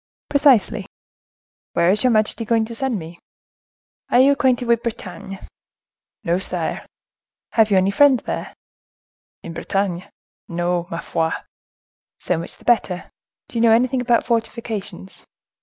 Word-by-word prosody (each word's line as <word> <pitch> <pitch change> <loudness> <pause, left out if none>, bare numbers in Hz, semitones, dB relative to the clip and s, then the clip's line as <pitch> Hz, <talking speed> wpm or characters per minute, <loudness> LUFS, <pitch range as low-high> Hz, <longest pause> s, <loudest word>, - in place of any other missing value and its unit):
"Precisely." 240 -8 +3 0.9
"Where 170 +1 +3
is 210 +2 0
your 255 - +4
majesty 220 0 +1
going 225 0 +1
to 230 - -8
send 250 -1 -1
me?" 170 -1 -9 0.9
"Are 245 - +4
you 270 +2 +6
acquainted 255 -3 +1
with 235 -1 +3
Bretagne?" 210 -3 -6 0.9
"No, 170 +2 +1
sire." 175 -3 -2 0.6
"Have 220 -2 +4
you 200 - +4
any 190 +1 +3
friends 265 +3 +4
there?" - - -5 0.9
"In 165 - -7
Bretagne? 185 +1 -2 0.4
No, 175 0 -1
ma 165 - -4
foi!" 160 0 -1 0.9
"So 180 -3 -1
much 170 - -6
the - - -21
better. 195 -7 +1 0.4
Do 235 - -4
you - - +2
know 230 -1 +6
anything 250 +2 +2
about 240 -1 +2
fortifications?" 225 -5 -4
215 Hz, 140 wpm, -21 LUFS, 180-235 Hz, 0.9 s, you